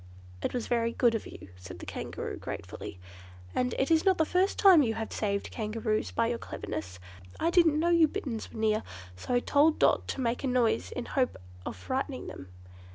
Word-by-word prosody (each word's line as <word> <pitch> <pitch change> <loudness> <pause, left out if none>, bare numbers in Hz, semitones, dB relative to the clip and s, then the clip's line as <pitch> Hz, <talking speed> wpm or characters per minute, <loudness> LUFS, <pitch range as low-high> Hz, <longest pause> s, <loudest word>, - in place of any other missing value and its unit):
"It - - -1
was 245 -2 -2
very 230 -1 0
good 240 -2 +3
of 225 - -3
you," - - -11
said 90 0 -10
the - - -9
Kangaroo - - -5
gratefully, - - -7 0.5
"and 250 0 0
it 270 +4 +1
is 320 0 +5
not 380 -2 +4
the 320 - +3
first 370 +5 +1
time 375 -6 +8
you 225 -5 +1
have 220 -1 -4
saved 200 -2 -1
Kangaroos 215 0 -1
by 230 - +1
your 235 0 -1
cleverness. 100 -4 -6 0.4
I 335 - +2
didn't 330 -4 +4
know 340 +2 +2
you 335 -2 +6
Bitterns 275 - -5
were - - -8
near, 215 0 +2 0.3
so 90 - -2
I 245 - +3
told 300 +4 +3
Dot - - +3
to - - -4
make 240 +1 -1
a - - 0
noise 235 -3 +1
in 250 - -4
the - - -10
hope 260 -3 +1 0.3
of - - -4
frightening 90 -1 -3
them." 95 - -8
240 Hz, 210 wpm, -29 LUFS, 220-305 Hz, 0.5 s, time